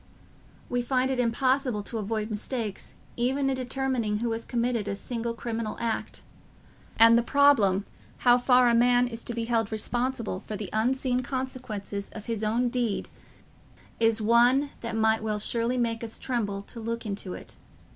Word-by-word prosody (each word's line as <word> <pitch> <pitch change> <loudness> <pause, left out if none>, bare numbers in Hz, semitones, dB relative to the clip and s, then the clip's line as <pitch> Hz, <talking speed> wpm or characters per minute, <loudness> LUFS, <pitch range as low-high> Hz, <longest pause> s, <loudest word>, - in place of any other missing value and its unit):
We 245 0 0
find 255 +1 +1
it 260 - -1
impossible 250 -1 +1
to 225 +2 -4
avoid 215 +1 -2
mistakes 215 0 -4 0.2
even 270 +3 +1
in - - 0
determining 255 -4 -1
who 235 +1 -1
has 225 0 -3
committed 235 -3 -1
a 200 - -1
single 230 +2 -4
criminal 230 -2 -4
act, 230 -1 -3 0.7
and 230 +1 +8
the 235 - +5
problem 235 -8 +4 0.4
how 245 0 +7
far 250 0 +5
a 235 - +4
man 245 +1 +4
is 230 -1 -7
to 235 - -4
be 230 - -2
held 225 -3 0
responsible 235 -2 -2
for 215 - -4
the 205 -2 -6
unforeseen 250 +3 +1
consequences 250 -6 -4
of 215 -1 -8
his 225 -2 -3
own 235 +3 +1
deed 235 -4 -1 0.9
is 225 -1 +3
one 245 +5 +4
that 230 -1 -4
might 220 0 +2
well 215 -1 -2 0.4
make 230 -1 -1
us 225 -1 -6
tremble 205 -6 -2
to 230 - -11
look 230 +1 -4
into 200 -3 -4
it. - - -10
230 Hz, 165 wpm, -27 LUFS, 220-250 Hz, 0.9 s, and